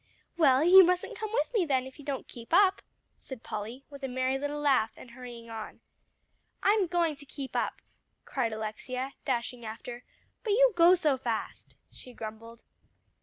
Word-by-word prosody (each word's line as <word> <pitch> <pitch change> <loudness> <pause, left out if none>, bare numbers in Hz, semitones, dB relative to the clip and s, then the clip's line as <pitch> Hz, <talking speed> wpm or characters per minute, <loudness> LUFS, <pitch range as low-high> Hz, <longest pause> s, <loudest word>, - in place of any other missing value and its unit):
"Well, 285 -4 +5
you 375 +3 +9
mustn't 360 0 0
come 435 -1 -4
with 475 - 0
me, 430 -6 +3
then, 265 -5 +1
if 265 +3 -12
you 290 - -11
don't 280 -2 -4
keep 230 -1 -11
up," 380 +2 +5 0.4
said 260 -4 -10
Polly, 225 +6 -6
with 280 0 -10
a - - -1
merry 260 +1 0
little 290 +1 -3
laugh, 270 -6 +3
and 245 - -12
hurrying 240 -2 -10
on. 220 -1 -7 0.8
"I'm 405 -2 +3
going 340 -3 +1
to 285 - -13
keep 270 -1 -7
up," - - -2 0.4
cried 240 -4 -1
Alexia, 220 +5 -4
dashing 245 -1 -2
after, 240 +2 -7 0.4
"but 430 -4 +1
you - - +5
go 345 +1 +7
so 305 -6 +1
fast," 235 -3 -4 0.2
she 250 - -13
grumbled. 230 +1 -9
265 Hz, 170 wpm, -29 LUFS, 235-340 Hz, 0.8 s, you